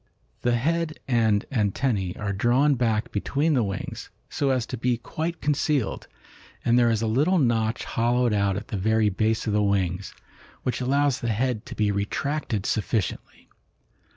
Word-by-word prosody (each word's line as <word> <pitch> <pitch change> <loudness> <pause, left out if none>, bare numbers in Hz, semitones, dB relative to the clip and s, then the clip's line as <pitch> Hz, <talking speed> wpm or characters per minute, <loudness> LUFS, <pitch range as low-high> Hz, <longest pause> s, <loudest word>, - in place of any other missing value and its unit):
The 120 0 +2
head 160 +5 0
and 110 -4 +2
antennae 105 -4 0
are 105 -1 -2
drawn 125 +8 +3
back 115 -4 0
between 145 +9 0
the 130 - +3
wings, 100 -3 -4 0.2
so 140 - 0
as 130 -3 +1
to 125 - -5
be 120 +1 +1
quite 160 +8 -4
concealed, 145 -4 0 0.6
and 120 - +4
there 120 -1 +4
is 115 -1 +1
a - - +1
little 145 +12 +2
notch 115 -6 +1
hollowed 120 0 +1
out 100 -2 +1
at 105 - -7
the 105 - -2
very 110 +2 +2
base 110 +3 0
of 110 - -1
the 105 - +3
wings, 95 -2 0 0.5
which 125 - -2
allows 140 +1 +2
the 120 - -2
head 115 0 -1
to - - -7
be 105 -1 +1
retracted 105 +2 -2
sufficiently. 110 -1 -2
115 Hz, 165 wpm, -25 LUFS, 105-130 Hz, 0.6 s, and